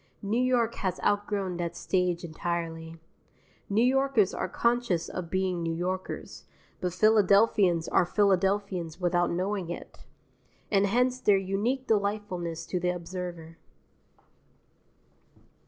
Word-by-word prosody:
New 215 +5 +1
York 245 -2 +2
has 185 -2 -1
outgrown 205 -3 0
that 170 -1 -3
stage 180 0 0
entirely: 165 0 -4 0.7
New 210 +3 +3
Yorkers 265 -5 +3
are - - -3
conscious 235 -6 0
of 180 -2 -6
being 185 -1 -1
New 165 -1 -2
Yorkers, 185 +2 -4 0.3
but 180 - -2
Philadelphians 200 -3 +4
are - - +3
Philadelphians 190 -2 0
without 175 -1 +1
knowing 185 0 -2
it; 175 - -9 0.6
and 200 -1 +3
hence 250 +4 +1
their 205 -5 +4
unique 205 +8 -1
delightfulness 200 -6 -1
to 180 - -2
the 180 +1 0
observer. 175 -2 -6
185 Hz, 115 wpm, -28 LUFS, 175-210 Hz, 0.7 s, Philadelphians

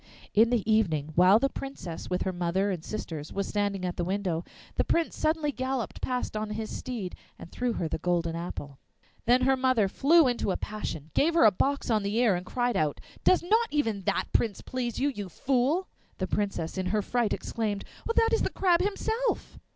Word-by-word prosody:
In 225 +2 +5
the 235 -4 0
evening, 165 -9 +2
while 180 +5 +6
the 275 - +2
Princess, 270 - -7
with 180 0 0
her 190 - -2
mother 180 +3 0
and 175 -4 -4
sisters, 160 -8 -5
was 200 0 -2
standing 200 -2 -1
at 180 - -3
the 175 - 0
window, 180 -2 -1 0.3
the - - +1
Prince 335 -1 0
suddenly 310 -1 +1
galloped 260 -3 -3
past 250 -3 -2
on 215 0 -2
his 215 +1 -4
steed 230 -8 -5 0.2
and 170 - -11
threw 245 -1 -1
her 170 - -2
the 155 - -3
golden 170 -1 0
apple. 145 -5 -6 0.5
Then 245 +2 +4
her 265 +1 +4
mother 255 -5 +2
flew 300 - +5
into 245 -4 0
a 185 - 0
passion, 160 -8 -5
gave 330 +3 +2
her 330 - +6
a 215 - +8
box 275 +5 0
on 215 -1 +3
the 200 +1 -2
ear, 235 -3 +4
and 180 0 -3
cried 245 -2 0
out, 155 -5 0 0.2
'Does 370 - +4
not 445 +6 +3
even 225 -9 0
that 200 - +1
prince 220 -4 +1
please 245 -3 -3
you, 285 - +2
you 205 -8 -5
fool?' 270 - +1 0.3
The 185 - -1
Princess 195 -3 -2
in 185 - -1
her 210 +2 +1
fright 240 -1 0
exclaimed, 210 -3 -2 0.3
'That 455 0 +3
is 450 - +3
the - - +1
Crab 355 -2 +2
himself! 445 +5 -1
215 Hz, 205 wpm, -28 LUFS, 185-260 Hz, 0.5 s, a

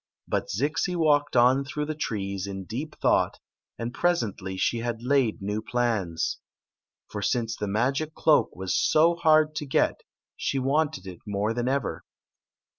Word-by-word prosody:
But - - -1
Zixi 155 - 0
walked 145 -4 +2
on 125 +3 +5
through 150 +2 -3
the 155 - -3
trees 100 -9 -3
in 95 -1 -5
deep 140 +10 -5
thought, - - +2 0.4
and 115 +1 -4
presendy 110 - -1
she 115 - +1
had 115 0 -3
laid 125 -5 +1
new 105 +2 -2
plans. 110 -9 -1 0.7
For 105 - -4
since 115 0 0
the 105 - -4
magic 135 +9 0
cloak 155 -2 +4
was 95 0 -2
so 165 +2 +4
hard 155 -2 +4
to 155 -1 -4
get 130 - +1 0.3
she 140 - -2
wanted 140 -4 0
it 90 -2 -8
more 105 +2 0
than 120 +1 -2
ever. 135 +1 -1
120 Hz, 155 wpm, -26 LUFS, 105-150 Hz, 0.7 s, on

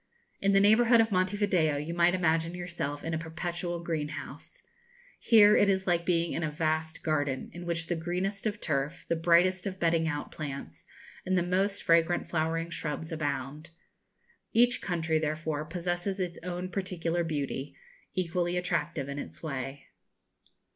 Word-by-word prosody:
In 200 0 +2
the 195 - +6
neighbourhood 225 +4 +6
of 225 -1 +3
Monte 185 +2 +1
Video 175 -8 +2
you 150 +4 -4
might 175 +1 +4
imagine 165 -1 +1
yourself 170 -5 -4
in 165 - -3
a 160 - 0
perpetual 170 +1 -4
greenhouse. 155 - -5 0.6
Here 210 -2 +7
it 205 - +4
is 190 -1 +1
like 170 -2 +1
being 170 -1 +1
in 165 - -2
a 155 - 0
vast 160 +1 -2
garden, 145 -4 -1
in 175 0 -8
which 165 -1 -1
the 175 - -1
greenest 180 +5 -2
of 210 0 -3
turf, 150 -1 -2
the 170 - +2
brightest 175 +3 +3
of 190 -1 -5
bedding 165 -1 +2
out 145 -2 -3
plants, 140 -3 -7 0.4
and 185 0 +1
the 175 - +2
most 190 +3 0
fragrant 170 +1 +3
flowering 165 +1 -1
shrubs 160 0 -4
abound. 145 0 -3 0.8
Each 245 +2 +4
country, 165 -3 0
therefore, 155 0 -2
possesses 175 +3 -3
its 180 -2 -3
own 180 +1 -4
particular 175 -3 -1
beauty, 145 -3 -3 0.4
equally 175 -1 0
attractive 170 -5 -1
in 140 +1 -4
its - - -8
way. 135 -2 -5
170 Hz, 160 wpm, -29 LUFS, 155-185 Hz, 0.8 s, Here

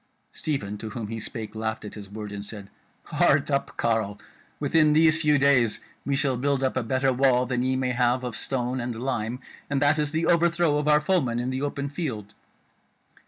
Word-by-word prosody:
Stephen 105 -9 -3
to 110 - -6
whom 110 0 -6
he 115 0 -4
spake 110 +1 -7
laughed 110 0 -3
at 105 - -8
his 100 -2 -9
word, 105 0 -7
and 100 0 -6
said: 100 -1 -10 0.3
"Heart - - +2
up, - - -1
carle! 110 -3 0 0.4
within 155 -2 +3
these 155 0 +4
few 150 -2 +4
days 135 -5 +3 0.3
we 140 - +1
shall 135 -2 +1
build 135 +1 0
up 130 - 0
a 130 - +1
better 130 +3 +1
wall 125 -1 +3
than 125 0 -1
ye 130 +1 +1
may 130 -1 0
have 125 +1 +1
of 125 -3 -4
stone 125 0 -2
and 120 -1 -4
lime; 125 -2 -2 0.3
and 140 -1 +1
that 145 +2 +3
is 150 -1 0
the 160 +2 -1
overthrow 170 -2 +3
of 150 - -2
our 150 0 +5
foemen 150 -8 +1
in 125 +2 -2
the 130 +1 -3
open 140 0 -2
field." 130 - -5
130 Hz, 205 wpm, -25 LUFS, 115-145 Hz, 0.4 s, our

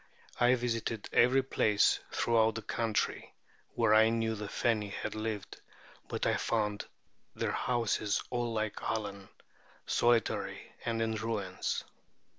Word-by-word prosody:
I 125 +1 +5
visited 115 -3 -2
every 130 +3 +5
place 105 -5 +3
throughout 110 -2 +2
the 115 - -5
country 115 0 -2 0.4
where 115 -2 +3
I 110 +1 +6
knew 115 -1 0
the 105 -1 -5
Feni 105 -1 0
had 100 - -4
lived; 110 -2 -4 0.5
but - - -2
I - - +2
found 105 -2 -1 0.5
their - - -1
houses 115 -4 0
all 120 -1 -1
like 110 -2 -2
Allen, 100 -3 -3 0.6
solitary 120 -2 +1
and 115 -1 0
in 110 0 -1
ruins. 105 -4 -2
110 Hz, 125 wpm, -32 LUFS, 105-115 Hz, 0.6 s, I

